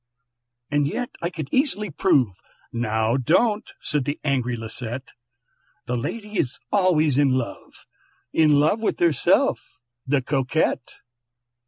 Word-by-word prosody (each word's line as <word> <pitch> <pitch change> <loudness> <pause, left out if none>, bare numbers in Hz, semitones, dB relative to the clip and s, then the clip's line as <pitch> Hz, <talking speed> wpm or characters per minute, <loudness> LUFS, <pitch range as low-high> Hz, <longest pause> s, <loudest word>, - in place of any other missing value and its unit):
"And 145 -1 +2
yet 245 +11 -3
I 170 - 0
could 160 -5 -6
easily 235 - +1
prove" 135 - +2 0.4
("Now 110 0 +1
don't!" 205 - +2
said 150 -5 -1
the 145 +3 -3
angry 125 -4 0
Lisette), 115 +3 -6 0.8
"The 125 - -2
lady 210 - -4
is 125 - -1
always 160 -8 +3
in 145 -1 +4
love, 130 -2 -5 0.5
In 150 -2 +5
love 160 +9 +2
with 225 - -1
herself, 165 -6 +3 0.5
the 135 -1 +2
Coquette! 135 0 0
145 Hz, 125 wpm, -23 LUFS, 125-175 Hz, 0.8 s, In